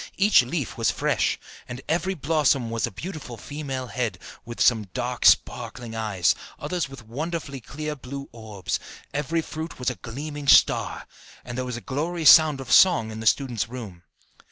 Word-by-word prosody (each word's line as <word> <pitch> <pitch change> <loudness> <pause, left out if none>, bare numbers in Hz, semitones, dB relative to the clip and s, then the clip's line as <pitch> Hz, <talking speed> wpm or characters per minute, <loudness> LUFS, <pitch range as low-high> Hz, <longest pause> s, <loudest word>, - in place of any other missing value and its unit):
Each 205 -4 +6
leaf 125 -1 -4
was 115 - +3
fresh, - - 0 0.3
and 125 0 -6
every 175 +4 0
blossom 145 -6 +1
was 115 +1 0
a - - -8
beautiful 145 - -7
female 135 -1 -5
head, 115 -6 -3 0.4
some 115 -3 +4
with 100 -4 -11
dark - - -3
sparkling 120 -2 +2
eyes, 105 -6 +1 0.2
others 175 -5 -3
with 135 -5 -11
wonderfully 145 +3 -4
clear 150 +5 -5
blue 140 +1 -8
orbs; 105 -5 -4 0.3
every 155 +3 -1
fruit 160 +2 -6
was 125 0 -1
a - - -7
gleaming 145 +4 -6
star, - - +4 0.4
and 120 - -6
there 130 0 -2
was 125 -2 -4
a - - -8
glorious 155 - +4
sound 155 -4 +6
of 135 - -7
song 160 -13 +6
in 110 - -7
the 110 - -2
student's 120 -4 +1
room. 110 -9 -8
130 Hz, 170 wpm, -25 LUFS, 115-155 Hz, 0.4 s, Each